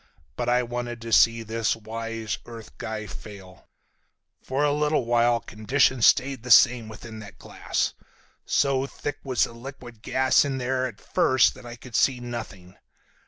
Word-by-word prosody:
But -, -, -2 dB
I 125 Hz, 0 st, +3 dB
wanted 120 Hz, 0 st, -5 dB
to 115 Hz, -, -6 dB
see 115 Hz, 0 st, +5 dB
this 110 Hz, 0 st, -1 dB
wise 115 Hz, -1 st, -5 dB
earth 115 Hz, -2 st, -11 dB
guy 110 Hz, -1 st, -5 dB
fail. 95 Hz, -2 st, -12 dB, 0.7 s
"For 135 Hz, +3 st, -2 dB
a 145 Hz, -1 st, +2 dB
little 150 Hz, -3 st, +1 dB
while 120 Hz, 0 st, +3 dB
conditions 120 Hz, +3 st, +2 dB
stayed 135 Hz, -1 st, +2 dB
the 125 Hz, -, -9 dB
same 120 Hz, -1 st, +6 dB
within 110 Hz, 0 st, -10 dB
that 105 Hz, -1 st, -11 dB
glass. -, -, -3 dB, 0.5 s
So 135 Hz, -1 st, +1 dB
thick 145 Hz, +1 st, -6 dB
was 130 Hz, -3 st, +1 dB
the -, -, -3 dB
liquid 120 Hz, -2 st, -11 dB
gas 130 Hz, +2 st, +3 dB
in 140 Hz, -2 st, -2 dB
there 130 Hz, 0 st, -1 dB
at 115 Hz, -5 st, -11 dB
first 130 Hz, -1 st, +3 dB
that 130 Hz, -1 st, -13 dB
I 120 Hz, -, -8 dB
could 120 Hz, 0 st, -11 dB
see 130 Hz, -2 st, +3 dB
nothing. 110 Hz, -7 st, -8 dB
120 Hz, 165 wpm, -25 LUFS, 110-130 Hz, 0.7 s, same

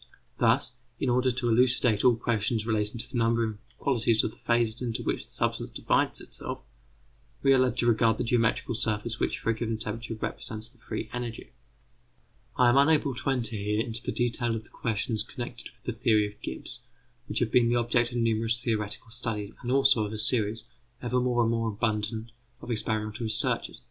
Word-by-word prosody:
Thus, 120 Hz, +2 st, +3 dB, 0.3 s
in 130 Hz, -, 0 dB
order 125 Hz, +1 st, +3 dB
to 125 Hz, 0 st, -2 dB
elucidate 120 Hz, -2 st, +3 dB
all 125 Hz, -2 st, +6 dB
questions 115 Hz, -1 st, 0 dB
relating 105 Hz, 0 st, 0 dB
to 115 Hz, -, -4 dB
the 120 Hz, -, -2 dB
number 115 Hz, 0 st, +2 dB
and 110 Hz, -2 st, -3 dB, 0.2 s
qualities 115 Hz, -4 st, +2 dB
of -, -, -1 dB
the -, -, -15 dB
phases 120 Hz, -1 st, +1 dB
into 120 Hz, -3 st, -2 dB
which -, -, -2 dB
the -, -, -17 dB
substance -, -, -1 dB
divides -, -, +1 dB
itself, -, -, -7 dB, 0.8 s
we 135 Hz, -1 st, +6 dB
are 130 Hz, -, +5 dB
led 130 Hz, -1 st, +2 dB
to -, -, +2 dB
regard 115 Hz, -1 st, +4 dB
the -, -, -1 dB
geometrical 115 Hz, 0 st, +1 dB
surface 110 Hz, 0 st, -1 dB
which -, -, 0 dB
for 115 Hz, -, 0 dB
a -, -, +1 dB
given 115 Hz, 0 st, -2 dB
temperature 115 Hz, +2 st, -4 dB
represents 110 Hz, 0 st, -4 dB
the 125 Hz, 0 st, -18 dB
free 115 Hz, -, -5 dB
energy. 120 Hz, -2 st, -5 dB, 1.1 s
I 125 Hz, -1 st, +6 dB
am 120 Hz, -, +4 dB
unable 145 Hz, -1 st, +4 dB
to 125 Hz, -, -3 dB
enter 120 Hz, -4 st, +1 dB
here 105 Hz, +1 st, -1 dB
into 115 Hz, 0 st, -3 dB
the -, -, -3 dB
detail 120 Hz, -1 st, 0 dB
of 110 Hz, -, -5 dB
the -, -, -12 dB
questions 110 Hz, -1 st, -1 dB
connected 120 Hz, 0 st, -7 dB
with -, -, -28 dB
the -, -, -28 dB
theories 105 Hz, -4 st, +3 dB
of 105 Hz, -, -31 dB
Gibbs, -, -, -5 dB, 0.5 s
which -, -, -3 dB
have 115 Hz, -2 st, +1 dB
been 120 Hz, -1 st, +4 dB
the 120 Hz, -, +2 dB
object 120 Hz, 0 st, +2 dB
of 120 Hz, -, -3 dB
numerous 115 Hz, 0 st, +1 dB
theoretical 110 Hz, 0 st, -2 dB
studies, 110 Hz, -3 st, -3 dB
and 120 Hz, -, -3 dB
also 135 Hz, -4 st, +5 dB
of 105 Hz, 0 st, -4 dB
a -, -, -3 dB
series, 110 Hz, 0 st, +1 dB, 0.4 s
ever 125 Hz, +1 st, +1 dB
more 125 Hz, -1 st, +2 dB
and 115 Hz, -, +2 dB
more 115 Hz, -1 st, 0 dB
abundant, 110 Hz, +1 st, -2 dB, 0.3 s
of 120 Hz, -, -7 dB
experimental 110 Hz, 0 st, -2 dB
researches. 110 Hz, -1 st, 0 dB
M. -, -, -14 dB
115 Hz, 200 wpm, -28 LUFS, 110-120 Hz, 1.1 s, all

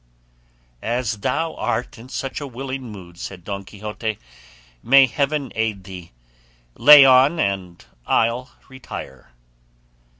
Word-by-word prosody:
"As 120 Hz, -2 st, -2 dB
thou 160 Hz, +8 st, -1 dB
art 125 Hz, +1 st, -3 dB
in 120 Hz, +3 st, -13 dB
such 135 Hz, +2 st, -5 dB
a 145 Hz, -, -5 dB
willing 130 Hz, -1 st, -6 dB
mood," 90 Hz, -4 st, -12 dB
said 90 Hz, -3 st, -8 dB
Don 100 Hz, +1 st, -5 dB
Quixote, 105 Hz, +2 st, -5 dB, 0.6 s
"may 135 Hz, +2 st, +6 dB
heaven 140 Hz, +2 st, -2 dB
aid 110 Hz, -3 st, -2 dB
thee; 90 Hz, -3 st, -10 dB, 0.6 s
lay 145 Hz, -, +9 dB
on 135 Hz, +5 st, +5 dB
and 95 Hz, -, -3 dB, 0.2 s
I'll 120 Hz, +3 st, +1 dB, 0.2 s
retire." 125 Hz, -, -10 dB
115 Hz, 120 wpm, -21 LUFS, 100-135 Hz, 0.6 s, lay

